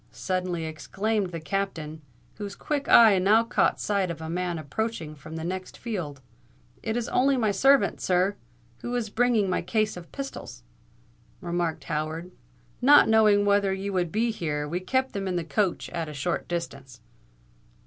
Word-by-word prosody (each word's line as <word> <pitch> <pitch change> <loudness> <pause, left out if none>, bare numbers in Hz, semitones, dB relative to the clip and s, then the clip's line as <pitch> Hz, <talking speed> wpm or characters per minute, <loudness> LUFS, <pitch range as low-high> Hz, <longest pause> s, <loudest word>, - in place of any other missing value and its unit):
suddenly 180 -3 -2
exclaimed 195 +7 -2
the 165 - -5
Captain, 160 -3 -3 0.4
whose 200 -1 -6
quick 290 -2 -3
eye 220 -5 +8
now 210 +5 +4
caught 230 - +1
sight 200 -3 0
of 165 -2 -5
a 160 - -6
man 175 0 -2
approaching 160 +1 -4
from 155 +2 -10
the 160 - -5
next 185 +2 -5
field. 175 - -5 0.6
"It's 230 +1 -2
only 270 +2 +3
my 220 -4 +2
servant, 265 +2 +3
sir, 185 +2 +2 0.4
who 240 0 -4
is 225 -4 -2
bringing 230 -3 +2
my 185 - 0
case 215 +4 0
of 175 -1 -11
pistols," 275 -1 -7 0.8
remarked 175 -2 -2
Howard. 160 +3 -3 0.5
"Not 290 +4 +7
knowing 210 -2 +5
whether 200 -1 +3
you 195 +1 -4
would 175 -3 0
be 230 +2 +1
here, 150 -7 -3
we 170 +4 -2
kept 260 +8 -1
them 195 -1 -3
in 185 - -1
the 175 - -1
coach 190 +2 -1
at 165 -2 -3
a - - -7
short 160 +5 -2
distance." 140 -7 -5
185 Hz, 165 wpm, -26 LUFS, 165-220 Hz, 0.8 s, eye